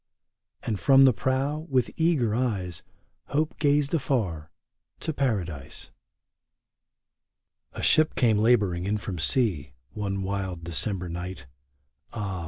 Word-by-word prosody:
And 105 Hz, -4 st, -2 dB
from 135 Hz, -1 st, +6 dB
the 130 Hz, -, +6 dB
prow, 140 Hz, +6 st, -1 dB
with 130 Hz, -3 st, +1 dB
eager 155 Hz, -10 st, +2 dB
eyes, 100 Hz, -8 st, -2 dB, 0.4 s
Hope 155 Hz, +2 st, -1 dB
gazed 145 Hz, -1 st, +2 dB
afar 100 Hz, -, -1 dB, 0.3 s
— -, -, -50 dB
to 160 Hz, -, -2 dB
Paradise. 90 Hz, -, -3 dB, 1.8 s
A -, -, -6 dB
ship 155 Hz, 0 st, +4 dB
came 110 Hz, -5 st, +3 dB
laboring 105 Hz, -6 st, +2 dB
in 105 Hz, +2 st, 0 dB
from 95 Hz, -4 st, -5 dB
sea, 85 Hz, -, 0 dB, 0.2 s
One 100 Hz, -2 st, -3 dB
wild 95 Hz, -3 st, -3 dB
December 90 Hz, +3 st, -2 dB
night; 85 Hz, -4 st, -6 dB, 0.7 s
Ah 100 Hz, -5 st, -3 dB
105 Hz, 120 wpm, -26 LUFS, 90-135 Hz, 1.8 s, from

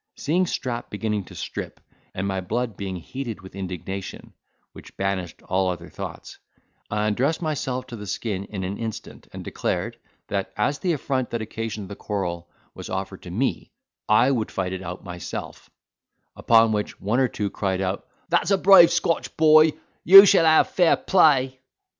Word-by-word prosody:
Seeing 175 Hz, +5 st, +1 dB
Strap 120 Hz, -6 st, -4 dB
beginning 105 Hz, -1 st, -2 dB
to -, -, -13 dB
strip, -, -, -6 dB, 0.4 s
and 95 Hz, +1 st, -2 dB
my 95 Hz, -1 st, -2 dB
blood 115 Hz, +4 st, -3 dB
being 95 Hz, -1 st, -5 dB
heated 115 Hz, +5 st, -6 dB
with 95 Hz, 0 st, -13 dB
indignation, 95 Hz, 0 st, -6 dB, 0.4 s
which -, -, -14 dB
banished 95 Hz, -3 st, -3 dB
all 95 Hz, 0 st, 0 dB
other 85 Hz, -1 st, -5 dB
thoughts, -, -, -8 dB, 0.5 s
I 105 Hz, 0 st, -1 dB
undressed 130 Hz, +9 st, 0 dB
myself 130 Hz, -5 st, -2 dB
to 120 Hz, -, -9 dB
the 105 Hz, -2 st, -8 dB
skin 100 Hz, 0 st, -3 dB
in 100 Hz, -2 st, -6 dB
an 95 Hz, +2 st, -4 dB
instant, 115 Hz, -2 st, -7 dB
and -, -, -8 dB
declared, -, -, -3 dB, 0.3 s
that 100 Hz, -1 st, -3 dB
as 140 Hz, +7 st, 0 dB
the 180 Hz, -2 st, 0 dB
affront 130 Hz, -4 st, -2 dB
that 115 Hz, -2 st, -3 dB
occasioned 110 Hz, -2 st, -5 dB
the 100 Hz, -, -8 dB
quarrel 85 Hz, -5 st, -4 dB, 0.2 s
was -, -, -9 dB
offered -, -, -5 dB
to -, -, -10 dB
me, -, -, -2 dB, 0.4 s
I 115 Hz, +5 st, +5 dB
would 115 Hz, -5 st, -1 dB
fight 95 Hz, -1 st, -3 dB
it 95 Hz, -, -5 dB
out 90 Hz, 0 st, -7 dB
myself; 90 Hz, -2 st, -7 dB, 0.7 s
upon 115 Hz, -1 st, +4 dB
which 105 Hz, -1 st, -3 dB
one 105 Hz, +6 st, 0 dB
or 130 Hz, -, +3 dB
two 105 Hz, -4 st, -3 dB
cried 95 Hz, -2 st, -2 dB
out, 95 Hz, 0 st, -3 dB, 0.2 s
"That's 170 Hz, +2 st, +1 dB
a 195 Hz, -, +4 dB
brave 190 Hz, -3 st, +8 dB
Scotch 170 Hz, -1 st, -1 dB
boy; 155 Hz, 0 st, +6 dB, 0.3 s
you 195 Hz, +3 st, +11 dB
shall 170 Hz, -4 st, +5 dB
have 160 Hz, 0 st, +5 dB
fair 175 Hz, -3 st, +4 dB
play." 135 Hz, -8 st, +3 dB
110 Hz, 170 wpm, -24 LUFS, 95-135 Hz, 0.7 s, you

